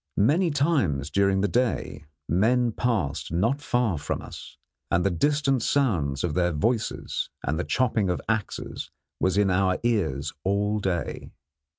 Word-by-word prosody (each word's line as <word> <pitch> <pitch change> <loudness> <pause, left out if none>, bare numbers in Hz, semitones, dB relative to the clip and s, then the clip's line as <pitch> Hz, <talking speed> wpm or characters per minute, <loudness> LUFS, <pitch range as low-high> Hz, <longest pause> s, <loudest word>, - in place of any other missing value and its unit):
Many 160 - +3
times 130 - +1
during 100 +1 +2
the 105 - +2
day 115 - -1 0.2
men 120 +7 +2
passed 105 - -1
not 115 - +1
far 120 - 0
from - - -3
us, - - -10 0.3
and 85 +2 +1
the 100 - +3
distant 135 - +1
sounds 85 - +1
of 85 -4 -1
their 90 +1 +2
voices 110 +9 -1
and 75 +5 -1
the - - 0
chopping 110 -5 +1
of 90 - 0
axes 110 -3 -3 0.3
was 95 +1 +1
in 100 -2 +3
our 95 0 +2
ears 80 - 0
all 105 +2 +1
day. 95 -4 -3
100 Hz, 150 wpm, -26 LUFS, 85-125 Hz, 0.3 s, Many